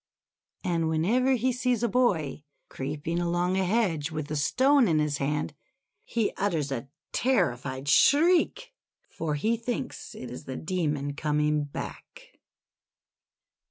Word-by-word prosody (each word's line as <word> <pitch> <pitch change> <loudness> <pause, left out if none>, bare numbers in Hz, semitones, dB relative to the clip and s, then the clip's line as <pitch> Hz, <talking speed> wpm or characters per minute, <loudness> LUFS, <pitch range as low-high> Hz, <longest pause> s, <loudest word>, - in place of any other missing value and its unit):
And 165 -3 0
whenever 225 +12 +2
he 255 +1 +1
sees 245 -2 0
a - - +3
boy 195 - +1 0.3
creeping 150 +5 -3
along 175 +1 0
a 190 - +2
hedge 180 -7 +1
with 155 -2 -5
a - - -1
stone 260 - +4
in 160 -3 +2
his 150 -2 0
hand, 150 +2 -1 0.5
he 230 -3 0
utters 165 -8 0
a 135 0 -3 0.3
terri 210 - +2
fied 130 +2 -6
shriek, 330 - +4 0.4
for 155 -2 -2
he 220 +11 +1
thinks 245 +2 -5
it 125 - -8
is 125 - -8
the 130 - -5
Demon 150 -5 -2
coming 150 0 0
back. - - -9
165 Hz, 135 wpm, -27 LUFS, 150-235 Hz, 0.5 s, stone